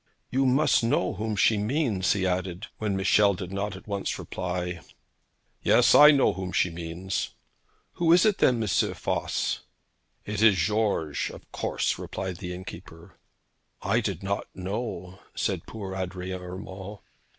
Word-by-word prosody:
'You 135 +1 +2
must 135 0 +3
know 115 -6 +1
whom 110 0 -3
she 100 +2 +3
means,' 110 - +1
he 95 -2 -1
added, 90 +1 -2
when 105 -3 -1
Michel 100 +1 +4
did 90 0 -6
not 100 0 -2
at 95 - -12
once 100 -1 -2
reply. 90 -1 -4 0.8
'Yes; 120 -2 +5
I 150 0 +10
know 140 -3 +4
whom 95 -1 -5
she 90 - +2
means.' 85 +3 -4 0.6
'Who 165 -1 +2
is 175 +3 +6
it 210 -3 +2
then, 125 - +4
M. - - -2
Voss?' 95 - 0 0.7
'It 105 0 -3
is 110 -4 +6
George, 95 -5 0
of - - -13
course,' - - -1
replied 95 -2 -5
the 90 -1 -6
innkeeper. 90 -2 -10 0.6
'I - - +2
did - - -3
not 100 +1 -2
know,' 95 -2 -5 0.2
said - - -2
poor 100 -4 -6
Adrian 95 0 -4
Urmand. 95 +2 -8
95 Hz, 150 wpm, -27 LUFS, 90-110 Hz, 0.8 s, I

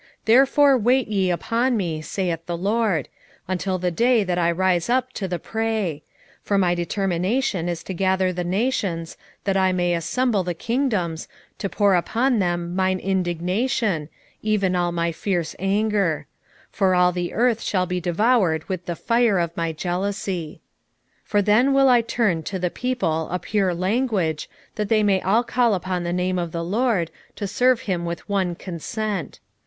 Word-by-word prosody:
3:8 - - -27 0.2
Therefore 270 +4 +5
wait 250 +3 +2
ye 195 -3 +1
upon 230 +7 0
me, 165 -6 -2
saith 170 -1 -3
the 175 -1 -2
LORD, 200 - 0 0.4
until 185 +1 -1
the 180 0 -1
day 235 +4 +3
that 180 -2 -1
I 170 -1 +2
rise 180 +1 +1
up 255 +1 +1
to 195 - -3
the 180 -1 -2
prey: 220 -8 -2 0.4
for 200 - 0
my 180 -3 +3
determination 180 +2 -1
is 170 -1 -4
to 190 - -5
gather 185 0 +1
the 180 0 -3
nations, 185 -4 -1 0.3
that 195 -1 0
I 190 -1 +3
may 175 -1 +1
assemble 205 +5 0
the 175 -1 -3
kingdoms, 210 - -1 0.3
to 195 - -2
pour 200 -1 +2
upon 235 +7 +1
them 175 -1 -1
mine 185 0 +1
indignation, 185 - -1 0.3
even 200 -4 +1
all 175 -1 +1
my 170 0 0
fierce 170 -1 -2
anger: 200 -3 +1 0.5
for 190 -3 +2
all 180 0 +4
the 175 -1 -3
earth 230 0 +1
shall 185 -2 0
be 180 0 -3
devoured 175 -2 +2
with 185 -2 -4
the 175 - -2
fire 230 0 +2
of 170 -1 -1
my 165 -1 -1
jealousy. 180 -1 -3 0.6
3:9 - - -35
For 205 -1 +2
then 240 +7 +4
will 270 -1 +5
I 245 -2 +5
turn 220 -7 0
to 190 +5 -4
the 180 -1 -1
people 165 -11 -1
a 180 - -1
pure 190 0 0
language, 185 - 0 0.3
that 210 -1 -2
they 215 -1 +3
may 195 -2 +2
all 220 +6 +2
call 240 -3 +2
upon 185 -1 -3
the 170 - -2
name 180 +1 0
of 170 -2 -3
the 170 0 -3
LORD, 200 -3 0 0.2
to 205 - -4
serve 245 +5 +2
him 180 -4 -2
with 170 -1 -5
one 190 -4 0
consent. 190 +2 -4
190 Hz, 175 wpm, -23 LUFS, 175-220 Hz, 0.6 s, Therefore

